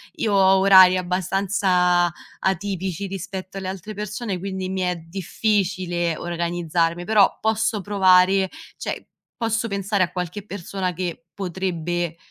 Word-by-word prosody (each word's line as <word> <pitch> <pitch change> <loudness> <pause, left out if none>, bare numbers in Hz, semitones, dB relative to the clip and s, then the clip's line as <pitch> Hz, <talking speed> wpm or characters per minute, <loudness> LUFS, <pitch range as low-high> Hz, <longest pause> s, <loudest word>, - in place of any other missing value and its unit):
Io 215 -2 -1
ho 190 -1 +5
orari 190 -1 +7
abbastanza 180 -1 +1 0.3
atipici 190 0 -2
rispetto 190 0 -6
alle 190 -1 -4
altre 195 +3 -7
persone 210 0 -4
quindi 190 0 -4
mi 190 0 -3
è 180 0 0
difficile 180 -1 -1
organizzarmi, 170 0 -1
però 215 -2 +4
posso 220 0 0
provare, 190 -1 +4 0.3
cioè - - -5 0.3
posso 225 0 -1
pensare 200 0 0
a 180 - -2
qualche 180 +3 -5
persona 190 -2 -4
che 170 -1 -5
potrebbe 175 -3 -3
185 Hz, 120 wpm, -22 LUFS, 175-200 Hz, 0.3 s, orari